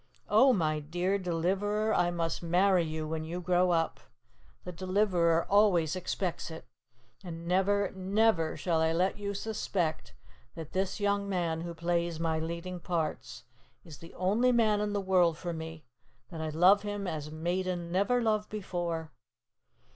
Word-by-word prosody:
"Oh, 265 0 +6
my 155 -8 +1
dear 175 +6 -1
Deliverer, 195 +5 0
I 175 - +2
must 170 -1 -2
marry 180 +2 +3
you 155 -1 -4
when 160 0 -3
you 170 +3 -5
grow 180 0 +2
up. 165 -2 0 0.6
The 180 - -6
Deliverer 180 -2 +1
always 185 -6 +3
expects 185 -1 -3
it. 160 0 -9 0.6
And 170 -2 -7
never, 195 +2 +2
never, 190 -3 +1
shall 165 -3 0
I 160 0 +2
let 185 +4 0
you 200 0 -3
suspect 195 -6 -2 0.4
that 160 -2 -8
this 190 +1 -2
young 200 0 0
man 170 -4 -1
who 170 0 -6
plays 170 -1 -1
my 160 -1 0
leading 170 +3 -5
parts 165 -3 -3 0.4
is 155 -4 -12
the 165 - -13
only 210 +8 +2
man 215 -3 +3
in 210 0 -1
the 205 - 0
world 180 -4 +3
for 175 0 -4
me, 160 -2 -7 0.5
that 165 -2 -6
I 160 - -2
love 180 +6 +5
him 205 -1 -4
as 155 -4 -4
maiden 175 +2 -2
never 205 +7 +2
loved 215 -1 0
before. 175 -6 -4
175 Hz, 155 wpm, -30 LUFS, 165-200 Hz, 0.6 s, Oh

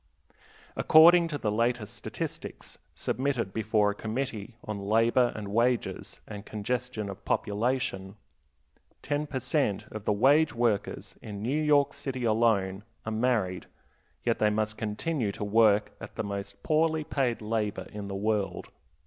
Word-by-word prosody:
According 170 +2 +7
to 150 -3 -3
the 110 -6 -1
latest 115 0 0
statistics - - -6 0.2
submitted 130 -7 -1
before 110 -2 +2
a - - -4
Committee 110 0 -4
"on 105 -2 -4
labor 115 +4 +3
and 105 -2 -5
wages, 120 +3 0
and 105 -1 -7
congestion 110 +1 -3
of 100 0 -8
population," 105 -3 -1 0.9
ten 150 +1 -1
per 145 - -4
cent. 130 -5 0
of 110 -1 -7
the - - +2
wage 140 +8 +4
workers 115 -4 -1
in 105 -2 -7
New 140 +7 0
York 145 -2 +3
City 130 -2 -5
alone 110 -4 +2 0.2
are 110 - -3
married, 110 -6 0 0.6
yet - - +1
they 105 - +4
must 110 0 -1
continue 110 +3 -2
to - - -5
work 105 0 +4
at - - -9
the - - -2
most 100 0 -6
poorly 160 0 +2
paid 130 -5 0
labor 105 -1 -2
in 105 -1 -6
the 100 - -5
world. 105 0 -1
110 Hz, 145 wpm, -28 LUFS, 105-130 Hz, 0.9 s, According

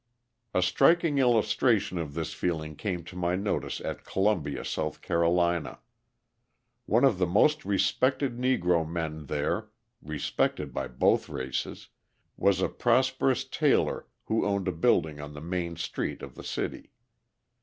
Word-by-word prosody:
A 90 - +3
striking 165 - +3
illustration 115 -5 +2
of 75 -4 -5
this 80 -1 -3
feeling 80 -3 -2
came 90 -1 -3
to 90 - -11
my 90 0 0
notice 100 +2 -2
at - - -5
Columbia, 90 -8 0
South 75 0 -3
Carolina. 85 0 +1 1.1
One 115 +4 +3
of 125 -9 +4
the 90 - +2
most 150 - +3
respected 130 +6 +1
Negro 90 -10 +2
men 80 -3 -4
there 75 +1 -1 0.3
respected 75 -2 -2
by - - -2
both 65 - +2
races 65 0 -4 0.5
was 95 -2 +2
a - - +3
prosperous - - +2
tailor - - +1 0.2
who 110 - +1
owned 100 -2 0
a - - +2
building 80 -2 +1
on 75 0 -8
the - - -7
main 85 +1 -3
street 85 - -4
of - - -8
the - - -11
city. - - -4
90 Hz, 140 wpm, -28 LUFS, 80-105 Hz, 1.1 s, of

